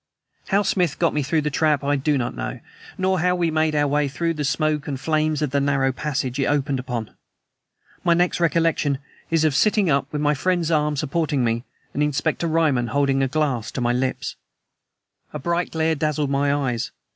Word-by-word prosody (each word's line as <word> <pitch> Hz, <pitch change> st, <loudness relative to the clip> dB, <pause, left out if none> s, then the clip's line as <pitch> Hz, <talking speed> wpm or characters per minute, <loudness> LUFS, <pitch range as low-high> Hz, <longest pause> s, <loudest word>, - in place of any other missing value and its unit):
How 200 Hz, +1 st, +2 dB
Smith 180 Hz, -7 st, +1 dB
got 170 Hz, -, +2 dB
me 150 Hz, -, 0 dB
through 155 Hz, +3 st, +1 dB
the 150 Hz, 0 st, -2 dB
trap 150 Hz, -1 st, +2 dB
I 145 Hz, +1 st, +1 dB
do 145 Hz, +1 st, +1 dB
not 120 Hz, -, -2 dB
know -, -, -4 dB, 0.4 s
nor 185 Hz, 0 st, +1 dB
how 180 Hz, +2 st, +2 dB
we 170 Hz, -2 st, 0 dB
made 155 Hz, 0 st, +1 dB
our 145 Hz, 0 st, +2 dB
way 145 Hz, +1 st, +1 dB
through 165 Hz, +5 st, -1 dB
the 150 Hz, -2 st, -3 dB
smoke 150 Hz, +1 st, 0 dB
and 135 Hz, -3 st, -3 dB
flames 155 Hz, +1 st, 0 dB
of 145 Hz, -, -1 dB
the 140 Hz, -, +2 dB
narrow 135 Hz, -1 st, +2 dB
passage 130 Hz, -2 st, -3 dB
it 135 Hz, -, +1 dB
opened 140 Hz, -2 st, 0 dB
upon. 125 Hz, -4 st, -4 dB, 0.9 s
My 170 Hz, -2 st, +4 dB
next 175 Hz, +1 st, +1 dB
recollection 165 Hz, -4 st, +2 dB, 0.3 s
is 165 Hz, -1 st, +2 dB
of 155 Hz, -2 st, +3 dB
sitting 205 Hz, +2 st, +3 dB
up, 140 Hz, 0 st, 0 dB
with 150 Hz, -, -2 dB
my 150 Hz, 0 st, +2 dB
friend's 170 Hz, +2 st, 0 dB
arm 150 Hz, -1 st, +2 dB
supporting 150 Hz, -1 st, 0 dB
me 115 Hz, +1 st, -1 dB, 0.3 s
and 145 Hz, -, -1 dB
Inspector 150 Hz, +3 st, 0 dB
Ryman 155 Hz, -7 st, +2 dB
holding 135 Hz, +2 st, +1 dB
a 135 Hz, -, +2 dB
glass 130 Hz, -5 st, -1 dB
to -, -, -3 dB
my 120 Hz, 0 st, +1 dB
lips. 130 Hz, +1 st, -2 dB, 1.0 s
A -, -, -3 dB
bright 170 Hz, +4 st, -1 dB
glare 160 Hz, 0 st, +1 dB
dazzled 150 Hz, -1 st, -1 dB
my 140 Hz, +1 st, +2 dB
eyes. 125 Hz, -5 st, -1 dB
150 Hz, 200 wpm, -23 LUFS, 135-160 Hz, 1.0 s, My